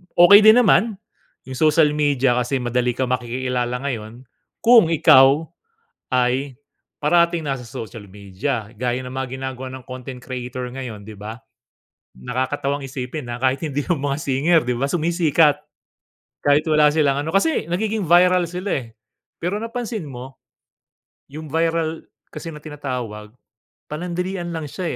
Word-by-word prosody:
okey 175 +4 +9
din 220 +1 +7
naman 220 0 +3 0.5
yung 130 -1 -8
social 155 -1 +4
media 145 -4 +1
kasi 125 +2 -1
madali 125 0 0
ka 130 - -1
makikilala 125 0 -2
ngayon, 120 -2 -5 0.4
kung 230 -6 +7
ikaw 140 -1 +6 0.7
ay 130 +1 0 0.4
parating 170 +1 +2
nasa 135 -3 -3
social 115 -1 -8
media. 105 +3 -4
Gaya 125 +2 -1
ng 125 0 -8
mga 130 0 -4
ginagawa 130 -1 -5
ng 130 -1 -9
content 130 0 -8
creator 125 0 -6
ngayon, 120 -6 -8
'di 110 - -9
ba? 105 +3 -8 0.8
Nakakatawang 135 +3 -2
isipin 130 0 -6
na, 120 - -4
kahit 130 +4 0
hindi 145 -2 -3
yung 170 -6 -1
mga 140 0 -1
singer, 145 +5 +2
'di 125 - 0
ba, 135 - 0
sumisikat. 165 -2 +2 0.8
Kahit 145 +1 +4
wala 150 -1 +4
silang 145 -3 +2
ano 160 - -4
kasi 245 - +1
nagiging 215 +2 -1
viral 180 +2 +5
sila, 180 -6 -3
eh. - - -13 0.5
Pero, 180 +4 -2
napansin 230 -4 -4
mo, 130 0 -9 1.0
yung 155 +1 -8
viral 165 0 -1 0.3
kasi 165 - -7
na 150 - -10
tinatawag, 125 -8 -6 0.6
panandalian 175 +3 -4
lang 160 -2 -4
siya, 185 +5 -5
140 Hz, 140 wpm, -21 LUFS, 125-165 Hz, 1.0 s, okey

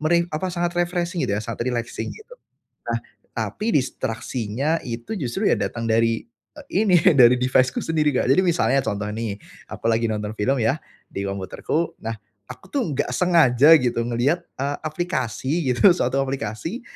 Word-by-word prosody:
meri 165 +2 +3 0.3
sangat 175 0 -1
refreshing 175 0 -1
gitu, 100 - -1
ya, - - -4
sangat 115 +1 -6
relaxing. 120 0 -4 0.8
Nah, - - 0 0.3
tapi 215 +2 -3
distraksinya 130 +2 -1
itu 115 - -5
justru 165 - -1
ya - - +4
datang 115 -1 -3
dari 115 0 +1 0.3
e - - -8 0.2
ini, 185 -5 +5 0.2
dari 125 -1 +7
device-ku 130 0 +2
sendiri, 155 -2 +1
Kak. - - +1
Jadi 160 - +5
misalnya 135 -7 +2
contoh 105 -2 -2
nih, 110 -2 -3 0.3
aku - - -9
lagi 115 +1 +1
nonton 105 0 -3
film, 130 +7 +1
ya, 115 +7 +2 0.3
di - - -5
komputerku. 100 - -2
Nah, 115 0 -3 0.3
aku - - -10
tuh 280 - +1
enggak 130 - -1
sengaja 160 -4 +5
gitu 120 -2 0
ngelihat, 120 +8 0 0.2
eee, 140 +2 -2
aplikasi 155 -2 -2
gitu, 175 +10 +6
suatu 135 - 0
aplikasi 135 - -4
130 Hz, 155 wpm, -23 LUFS, 115-165 Hz, 0.8 s, dari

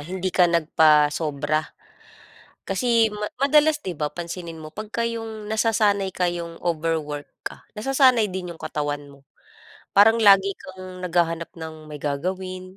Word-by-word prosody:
hindi 185 +4 -4
ka 180 -2 +4
nagpasobra. 155 -2 +2 1.0
Kasi 230 -3 +2 0.3
madalas 300 +2 +4
'di 180 -4 -5
ba 150 0 -2
pansinin 170 -1 -7
mo 155 - -8
'pagka 215 +6 -5
'yong 220 -2 -6
nasasanay 210 -3 +1
ka 180 -1 +1
'yong 170 -1 -6
overwork 155 -3 -2 0.2
ka, - - -7
nasasanay 250 -1 +3
din 180 -2 -5
'yung - - -17
katawan 145 -2 -3
mo. 140 - -16 0.8
Parang 225 +3 +6
lagi 195 -1 +6
kang 185 -1 -10
naghahanap 170 -2 0
ng 160 -1 -9
may 150 - -7
gagawin, 185 +6 -4
180 Hz, 130 wpm, -23 LUFS, 155-210 Hz, 1.0 s, Parang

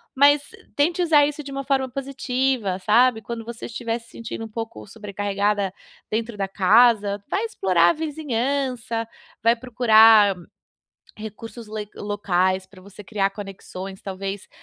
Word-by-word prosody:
mas 285 +2 +5 0.3
tente 335 +5 +1
usar 310 -4 +5
isso 295 +1 -4
de 280 - -9
uma 275 0 -4
forma 265 -1 0
positiva. 260 -5 -1
Sabe, 225 +4 +3
quando 230 +1 -6
você 235 0 -7
estiver 230 -1 -3
se 230 0 -20
sentindo 225 0 -7
um - - -10
pouco 220 - -6
sobrecarregada 205 - -2 0.4
dentro 225 0 -2
da 195 -1 -1
casa, 205 +1 +4
vai 415 +4 0
explorar 185 - +3
a - - +3
vizinhança, 260 -6 -2 0.4
vai 230 +1 +5
procurar 225 -4 +5 0.8
recursos 220 +2 -9
le 215 -1 -5
locais 190 -2 0
para 190 0 -17
você 200 +2 -13
criar 195 -1 0
conexões, 195 -1 -8
talvez 195 0 -6
225 Hz, 140 wpm, -23 LUFS, 200-255 Hz, 0.8 s, mas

